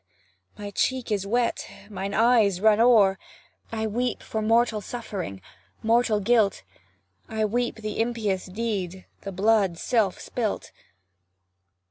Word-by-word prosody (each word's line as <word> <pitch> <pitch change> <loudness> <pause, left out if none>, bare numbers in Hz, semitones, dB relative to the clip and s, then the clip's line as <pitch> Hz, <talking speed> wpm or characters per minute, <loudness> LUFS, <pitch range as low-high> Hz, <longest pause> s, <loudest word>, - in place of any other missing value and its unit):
my 205 -1 -6
cheek 255 +2 -1
is 200 -2 -1
wet 235 +2 0 0.2
mine 195 -1 -5
eyes 220 -5 +4
run 215 +1 +4
o'er; 215 -5 +5 0.5
I 220 -1 -2
weep 240 +3 -2
for 220 - -3
mortal 225 0 +2
suffering, 195 - -6 0.4
mortal 225 -1 +3
guilt, 215 -1 +2 0.7
I 220 -1 0
weep 240 +3 -1
the 215 -1 -5
impious 220 -5 -1
deed, 190 -3 -3 0.2
the 195 - -6
blood 195 -2 +2
self 215 -2 0
spilt. 225 -4 -3
215 Hz, 120 wpm, -25 LUFS, 195-230 Hz, 0.7 s, o'er